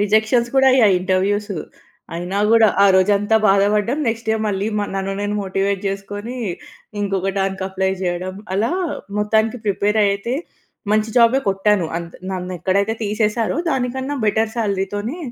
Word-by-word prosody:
Rejections 220 +3 +2
కూడా 265 0 +5
అయ్యాయి 220 -7 +5
ఇంటర్వ్యూస్సు. 195 +1 0 0.6
అయినా 180 +3 -3
కూడా, 225 -1 +6 0.2
ఆ - - +7
రోజంతా 205 +3 +3
బాధపడ్డం. 205 +6 +2
నెక్స్ట్ 225 0 -2
డే - - +3
మళ్ళీ 200 0 -1
మ - - 0
నన్ను 195 0 -2
నేను 205 0 -2
మోటివేట్ 195 0 -1
జేసుకొని, 205 +5 -5 0.6
ఇంకొక 195 -1 -1
దానికి 190 0 -1
అప్లై 190 0 -1
చేయడం. 180 +1 -2 0.2
అలా 215 +7 +1 0.5
మొత్తానికి 220 +3 +1
ప్రిపేర్ 205 +2 +1
అయితే, 200 +5 -1 0.6
మంచి 215 +1 +1
జాబే 235 +2 +5
కొట్టాను. 195 -1 +2
అంద్ 170 0 -6 0.2
నన్నేక్కడైతే 185 +3 -1
తీసేశారో 215 +4 0
దానికన్నా 265 +1 -2
బెటర్ 220 +1 +1
శాలరీతోనే 205 - -2
205 Hz, 135 wpm, -20 LUFS, 195-220 Hz, 0.6 s, ఆ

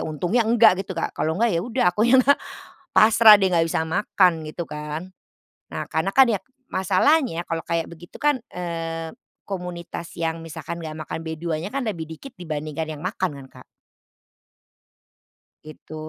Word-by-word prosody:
Untungnya 175 +10 0
enggak 225 -5 +5
gitu, 190 -2 -6
Kak. 165 - -2
Kalau 160 +2 -1
enggak 230 -1 +2
ya 170 - +1
udah, 245 +5 -1
aku 210 - -4
ya 260 - +7
nggak, 270 +2 +5 0.5
pasrah 220 -1 +7
deh. 195 - +1
Enggak 165 -1 +2
bisa 160 - 0
makan, 180 +1 +3 0.2
gitu 170 +1 -5
kan. 150 +5 -6 0.6
Nah, - - -5
karena 160 +5 -1
kan 265 -1 +7
ya 210 - +1 0.3
masalahnya 190 - +2
kalau 165 0 -3
kayak 165 0 -1
begitu 170 +1 -13
kan, 295 -2 +3 0.2
eee, 165 -2 -4 0.3
komunitas 175 -3 -6
yang 165 -1 -2
misalkan 165 +1 -7
nggak 160 -2 -6
makan 150 - -5
B2-nya, 160 - -4
kan 275 - -1
lebih 180 -9 -3
dikit 160 - -10
dibandingkan 155 -2 -4
yang 150 - -11
makan 185 -6 -2
kan, - - -13
Kak. - - -14 2.0
Itu. 155 0 -12
170 Hz, 160 wpm, -23 LUFS, 160-205 Hz, 2.0 s, ya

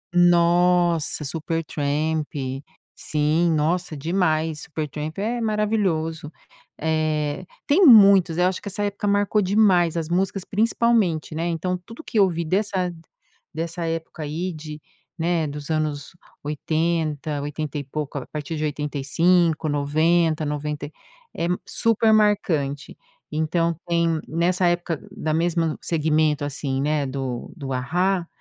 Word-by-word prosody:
Nossa, 175 -2 +3
Supertramp, 155 0 -2 0.7
sim. 155 +3 +1
Nossa, 160 +1 0
demais, 160 -1 0
Supertramp 155 0 -5
é 230 +4 -2
maravilhoso. 195 -8 -1 0.5
Eh, 155 0 -1 0.2
tem 350 +7 +4
muitos, 195 - +7
eu 180 - +4
acho 185 0 -2
que - - -9
essa 205 +1 -3
época 205 +1 -2
marcou 205 +1 +2
demais 185 -4 +3
as 165 -2 -2
músicas, 190 +2 0
principalmente 210 -7 +1
né, 165 +2 -2
então, 175 +2 -1
tudo 230 +5 -12
o - - -26
que 225 - -4
eu 195 - +6
vi 170 -1 -2
dessa 185 0 0 0.6
dessa 165 +2 -4
época 165 -1 -4
aí 165 +5 -3
de 155 -1 -8 0.4
né, 165 -1 0
dos 145 +1 -7
anos, 155 -1 -2 0.3
80, 155 -1 -1
oitenta 150 0 -4
e 145 - -3
pouco, 145 +1 -5
a 135 - -5
partir 150 +1 -5
de 155 - -3
85, 155 +3 +1
90, 155 +3 +2
90 150 0 -3
e - - -14 0.4
é 170 - -1 0.2
super 225 -1 +2
marcante. 175 -10 +1 0.3
Então, 165 +2 0
tem 170 -1 +1
nessa 175 +3 +1
época, 175 -3 -1
da 155 0 -3
mesmo 165 -1 0
segmento, 155 -2 +1
assim, 135 -1 -2
né, 150 0 0
do 130 -2 -4
do 135 -5 -5
A-Ha 175 +7 0
165 Hz, 130 wpm, -23 LUFS, 150-180 Hz, 0.7 s, muitos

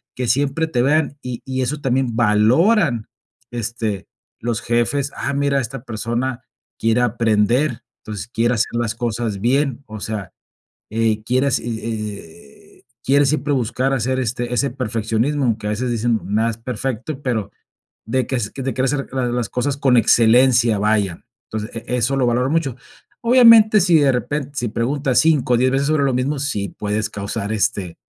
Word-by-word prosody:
que 125 -1 -3
siempre 140 +6 +1
te 125 -6 0
vean. 145 +2 +1
Y 125 -2 -5
y 130 0 -2
eso 140 +4 -2
también 130 -3 0
valoran, 120 - +3 0.4
este, 115 -4 -3 0.3
los 115 -1 -2
jefes, 125 +4 0
ah, 140 - -3
mira, 140 -1 +1
esta 120 +1 -6
persona 120 +2 -3 0.4
quiere 115 +1 +2
aprender, 120 +3 +1 0.2
entonces 105 -1 -6
quiere 120 +1 0
hacer 115 - -1
las 115 -1 -1
cosas 115 -3 -2
bien, 135 +4 +1
o 110 -1 -8
sea, 105 -3 -5 0.6
eh, 110 -1 0
quiere 130 +4 +1
hace 130 - 0
e 105 -9 -7
e - - -42 0.2
quiere 140 +2 +3
siempre 145 +1 0
buscar 130 +1 0
hacer, 130 +1 0
este, 120 0 -2
ese 135 +2 0
perfeccionismo, 120 +3 -1
aunque 110 -3 -1
a - - -1
veces 120 +4 -2
decimos: 115 -1 0
"Nada 110 +3 +1
es 110 - -9
perfecto, 130 +4 -4
pero 115 -7 -2 0.6
de 130 +2 -1
ques 120 -6 -2
de 135 -1 -3
querer 130 - -1
hacer 135 +1 -1
la 130 -2 0
las 120 -2 -1
cosas 140 +3 -1
con 135 -3 +3
excelencia, 120 0 +4
vaya". 105 -4 0 0.3
Entonces, 110 0 -5
e 115 +2 -4
eso 125 +3 +1
lo 130 - +2
valoran 125 +3 +1
mucho. 155 -6 0 0.5
Obviamente, 230 -3 +7
si 175 -2 +4
de 140 -2 +4
repen 140 +3 -2
si 120 -4 -2
preguntas 130 +4 0
5, 150 -6 +3
o, - - +4
10 130 +2 +2
veces 140 +1 +1
sobre 155 -2 +2
lo 135 -2 +1
mismo, 135 +4 -1
sí 120 -8 -2
puedes 105 +1 -3
causar, 100 +1 -4
este, 95 -4 -1
120 Hz, 170 wpm, -20 LUFS, 110-135 Hz, 0.6 s, Obviamente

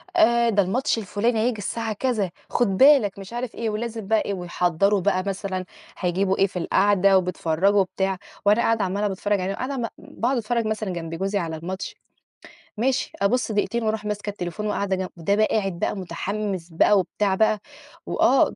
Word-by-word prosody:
آآ، 235 -9 +4
ده 205 -2 +3
الماتش 245 +8 0
الفلاني 220 +3 0
هييجي 230 0 +1
الساعة 225 +2 -3
كذا، 215 -5 -1 0.2
خُد 245 - +2
بالك، 265 -9 +5
مش 195 +3 -9
عارف 240 -1 -4
إيه، 230 -1 -2
ولازم 220 -1 -4
بقى 220 +1 +3
إيه، 200 - -3
ويحضّروا 180 +2 +1
بقى 185 0 +1
مثلًا 190 -1 -3 0.3
هيجيبوا 190 +2 0
إيه 195 - +4
في 180 -2 -5
القعدة 195 +1 +4
وبيتفرّجوا 180 +2 +1
وبتاع، 190 0 -1 0.3
وأنا 210 +3 +5
قاعدة 225 -2 +2
عَمّالة 200 +3 0
باتفرّج 205 +1 -1
عليهم، 190 +2 -2
قاعدة 265 +4 -3
م 235 - -1
باقعُد 250 +3 -2
اتفرّج 235 0 -1
مثلًا 215 -2 -2
جنب 165 -1 -5
جوزي 195 +4 -1
على 165 -3 -3
الماتش، 180 +4 -5 0.8
ماشي، 255 +3 0
أبُص 235 +4 +1
دقيقتين 225 +3 0
وأرُوح 215 -1 -1
ماسكة 210 0 -3
التليفون 200 +1 -4
وقاعدة 200 -2 0
جن 185 0 -3
ده 185 +5 +1
بقى 215 0 +4
قاعد 195 -5 -1
بقى - - 0
متحمِّس 195 -1 -4
بقى 185 +5 +4
وبتاع 195 +1 0
بقى، 215 +1 +2 0.5
وآه - - +3
205 Hz, 180 wpm, -24 LUFS, 190-225 Hz, 0.8 s, بالك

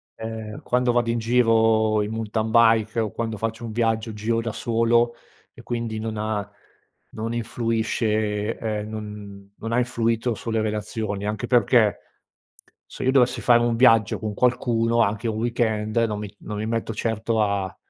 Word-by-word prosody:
ehm, 110 -1 -6
quando 125 0 +1
vado 120 -1 +1
in 115 - +1
giro 110 -2 +3
in 105 - -4
mountain 110 0 -2
bike, 115 -1 +4
o 110 -3 -1
quando 115 -2 -3
faccio 115 +2 -4
un 115 - -5
viaggio 115 0 0
giro 110 +2 -1
da 115 0 -3
solo, 115 +1 +1 0.4
e - - -13
quindi 115 -2 -3
non 110 0 -4
ha 105 -1 -2 0.6
non 115 +2 -4
influisce, 110 -2 -1
ehm, 105 -1 -3
non 105 -2 -8
non 115 - -5
ha - - +2
influito 115 -1 0
sulle 110 +1 -2
relazioni 105 -1 -3
anche 105 0 -3
perché, 120 -3 +3 0.9
se - - -8
io 130 - +3
dovessi 125 -2 +3
fare 120 -1 +5
un 120 -1 +1
viaggio 115 -3 +4
con 105 0 -4
qualcuno, 115 0 +2
anche 110 +1 0
un 110 -1 -2
weekend, 110 -2 -1
non 105 -1 -3
mi 105 -1 -7
non 105 - -6
mi 105 - -3
metto 115 0 -2
certo 110 0 -1
a 100 -2 -1
110 Hz, 165 wpm, -23 LUFS, 105-115 Hz, 0.9 s, fare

